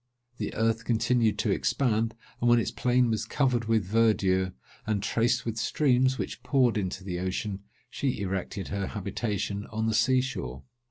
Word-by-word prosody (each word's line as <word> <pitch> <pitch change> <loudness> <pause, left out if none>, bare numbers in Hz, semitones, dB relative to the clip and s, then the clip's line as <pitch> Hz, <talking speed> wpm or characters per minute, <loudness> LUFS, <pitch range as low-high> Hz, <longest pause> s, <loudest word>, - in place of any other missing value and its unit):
The 105 - -4
earth 115 +1 +1
continued 115 -1 +2
to - - 0
expand; 115 -4 +1 0.3
and 120 - +3
when 120 - +6
its 115 - 0
plain 125 -1 +2
was 110 - 0
covered 125 -5 +1
with 110 -3 +2
verdure, 95 -3 +2 0.3
and 105 -2 0
traced 115 +2 +1
with 115 -1 -3
streams, 130 +2 +2
which - - -5
poured 130 -4 +2
into 95 -2 -2
the 90 -2 -4
ocean, 95 +2 -2 0.3
she 135 -5 -2
erected 95 0 -3
her 100 -1 -2
habitation 100 0 -3
on 110 0 -2
the 110 - +1
sea 130 +4 +4
shore. 65 - -5
110 Hz, 165 wpm, -28 LUFS, 100-120 Hz, 0.3 s, when